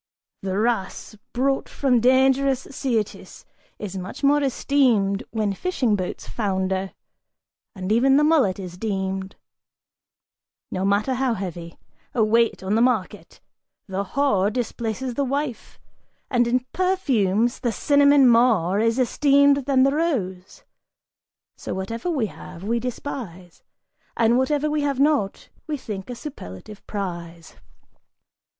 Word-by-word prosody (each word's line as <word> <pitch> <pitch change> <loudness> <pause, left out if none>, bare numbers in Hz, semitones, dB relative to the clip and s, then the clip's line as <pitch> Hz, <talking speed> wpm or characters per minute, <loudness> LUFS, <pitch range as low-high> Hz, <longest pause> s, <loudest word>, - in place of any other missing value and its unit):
The 190 0 -2
wrasse 215 -1 -2 0.2
brought 270 +3 0
from 260 -4 +2
dangerous 265 +2 +3
Syrtis 235 -6 -3 0.3
is 195 -2 -6
much 185 +9 -8
more 290 +1 +4
esteemed 250 -7 +2
When 215 -3 -1
fishing 255 - 0
boats 185 -2 -5
founder! 190 -3 -2 0.8
And 185 +1 -4
even 265 +5 +4
the 295 - +4
mullet 295 - +3
is 180 -2 -8
deemed, 190 -2 -3 1.4
No 185 - -2
matter 205 +6 +1
how 255 -2 0
heavy, 175 -4 -7 0.4
a 230 - +3
weight 230 -1 +2
on 190 +2 -1
the 225 - +3
market! 235 -6 -1 0.4
The 195 -1 -3
whore 205 -3 +1
Displaces 240 +1 -3
the 280 - 0
wife; 275 -3 -4 0.5
and 240 -2 +3
in 250 +1 +2
perfumes, 245 - +1
the 240 - -1
cinnamon 285 +1 +4
more 225 -6 +4
Is 225 +2 +2
esteemed 280 +1 +3
than 265 -2 +4
the 275 +1 +3
rose! 200 - -2 0.9
So - - -6
whatever 225 - -4
we 280 -9 0
have, 180 -3 -10
we 230 +3 0
despise, 225 -8 -7 0.6
And 235 +2 +3
whatever 290 +3 +1
we 300 0 0
have 280 -2 -1
not, 280 -9 +1 0.2
we 305 -1 -2
think 210 -5 -7
a 245 - -5
superlative 210 - -9
prize!" 170 -4 -6
230 Hz, 130 wpm, -23 LUFS, 195-270 Hz, 1.4 s, more